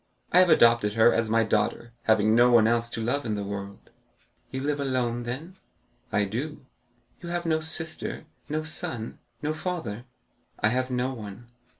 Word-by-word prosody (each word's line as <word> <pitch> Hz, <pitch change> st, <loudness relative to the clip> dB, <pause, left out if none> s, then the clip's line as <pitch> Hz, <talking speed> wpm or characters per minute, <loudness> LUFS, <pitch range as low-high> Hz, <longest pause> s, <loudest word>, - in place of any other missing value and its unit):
I 180 Hz, -, +6 dB
have 185 Hz, -1 st, +5 dB
adopted 115 Hz, -8 st, +5 dB
her 115 Hz, +1 st, +6 dB
as 115 Hz, -1 st, 0 dB
my 115 Hz, +1 st, +3 dB
daughter, 110 Hz, +2 st, -1 dB
having 110 Hz, -1 st, +4 dB
no 120 Hz, +2 st, +6 dB
one 120 Hz, -3 st, +6 dB
else 115 Hz, 0 st, +1 dB
to 115 Hz, -1 st, -4 dB
love 140 Hz, +5 st, 0 dB
in 110 Hz, -3 st, -2 dB
the 100 Hz, -, -3 dB
world." 100 Hz, 0 st, -7 dB, 0.6 s
"You 130 Hz, -, -4 dB
live 145 Hz, +1 st, -1 dB
alone, 125 Hz, -3 st, -1 dB
then?" 155 Hz, +10 st, -6 dB, 0.5 s
"I 100 Hz, -, +2 dB
do." 130 Hz, +8 st, -5 dB, 0.5 s
"You 170 Hz, -, -8 dB
have 175 Hz, 0 st, -2 dB
no 160 Hz, -1 st, +2 dB
sister—no 155 Hz, -1 st, -3 dB
son—no 120 Hz, -1 st, -3 dB
father?" 155 Hz, -, -4 dB, 0.5 s
"I 105 Hz, -, +3 dB
have 130 Hz, +2 st, 0 dB
no 125 Hz, +1 st, -1 dB
one." 110 Hz, 0 st, -9 dB
120 Hz, 165 wpm, -26 LUFS, 110-150 Hz, 0.6 s, I